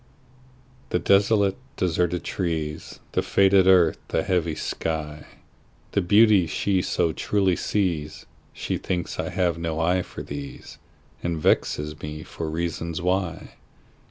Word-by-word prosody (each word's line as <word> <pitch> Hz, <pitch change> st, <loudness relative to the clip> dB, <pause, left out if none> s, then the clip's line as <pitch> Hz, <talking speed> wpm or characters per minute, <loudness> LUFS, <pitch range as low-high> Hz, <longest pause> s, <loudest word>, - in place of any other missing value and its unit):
The -, -, +1 dB
desolate, 100 Hz, +2 st, +3 dB, 0.2 s
deserted 90 Hz, 0 st, 0 dB
trees, 80 Hz, -4 st, -3 dB
The -, -, +1 dB
faded 95 Hz, -1 st, +4 dB
earth, 90 Hz, -4 st, +5 dB
the -, -, 0 dB
heavy 85 Hz, -4 st, 0 dB
sky, 75 Hz, -1 st, -4 dB, 0.6 s
The -, -, +1 dB
beauties 100 Hz, -2 st, +5 dB
she 95 Hz, +4 st, +1 dB
so 80 Hz, -2 st, 0 dB
truly 95 Hz, -1 st, +1 dB
sees, 85 Hz, -5 st, -2 dB, 0.3 s
She -, -, -3 dB
thinks 90 Hz, -2 st, -3 dB
I -, -, -1 dB
have 85 Hz, -3 st, 0 dB
no 80 Hz, -1 st, -2 dB
eye 90 Hz, +3 st, +2 dB
for -, -, -8 dB
these, 70 Hz, -1 st, -8 dB, 0.4 s
And 85 Hz, -1 st, -2 dB
vexes 75 Hz, 0 st, 0 dB
me 75 Hz, +1 st, -6 dB
for 80 Hz, -1 st, -5 dB
reason 85 Hz, 0 st, -3 dB
why. 90 Hz, 0 st, -1 dB
85 Hz, 130 wpm, -24 LUFS, 80-95 Hz, 0.6 s, earth